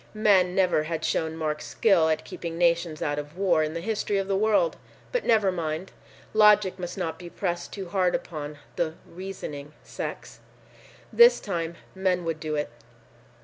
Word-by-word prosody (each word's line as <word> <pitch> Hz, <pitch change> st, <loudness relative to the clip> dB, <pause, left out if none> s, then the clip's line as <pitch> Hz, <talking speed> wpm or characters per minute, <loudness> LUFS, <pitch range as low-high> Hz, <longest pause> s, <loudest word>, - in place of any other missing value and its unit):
Men 195 Hz, -4 st, +4 dB
never 180 Hz, -5 st, +3 dB
had 165 Hz, 0 st, -3 dB
shown 160 Hz, 0 st, -1 dB
marked 155 Hz, -1 st, -2 dB
skill 180 Hz, -7 st, +3 dB
at 155 Hz, -, 0 dB
keeping 165 Hz, -1 st, -6 dB
nations 170 Hz, -2 st, +1 dB
out 145 Hz, 0 st, -1 dB
of 150 Hz, +3 st, -9 dB
war 180 Hz, -5 st, +3 dB
in 155 Hz, +1 st, -2 dB
the 170 Hz, -, -3 dB
history 210 Hz, 0 st, -1 dB
of 195 Hz, -1 st, -1 dB
the 195 Hz, -, +1 dB
world. 220 Hz, -, +2 dB, 0.4 s
But -, -, -1 dB
never 215 Hz, -4 st, +4 dB
mind! 165 Hz, 0 st, -3 dB, 0.4 s
Logic 210 Hz, -3 st, +5 dB
must 175 Hz, +1 st, -5 dB
not 165 Hz, -4 st, -3 dB
be 175 Hz, -1 st, -8 dB
pressed 175 Hz, -1 st, -3 dB
too 195 Hz, -3 st, -6 dB
hard 185 Hz, -2 st, +2 dB
upon 150 Hz, -2 st, -5 dB, 0.2 s
the 160 Hz, -2 st, -1 dB
"reasoning" 165 Hz, -6 st, -7 dB
sex. -, -, -7 dB, 0.7 s
This 475 Hz, +1 st, +7 dB
time, 170 Hz, -4 st, -3 dB, 0.2 s
men 185 Hz, -2 st, 0 dB
would 165 Hz, -1 st, -2 dB
do 155 Hz, -1 st, -3 dB
it. 150 Hz, -5 st, -2 dB
175 Hz, 170 wpm, -26 LUFS, 160-195 Hz, 0.7 s, This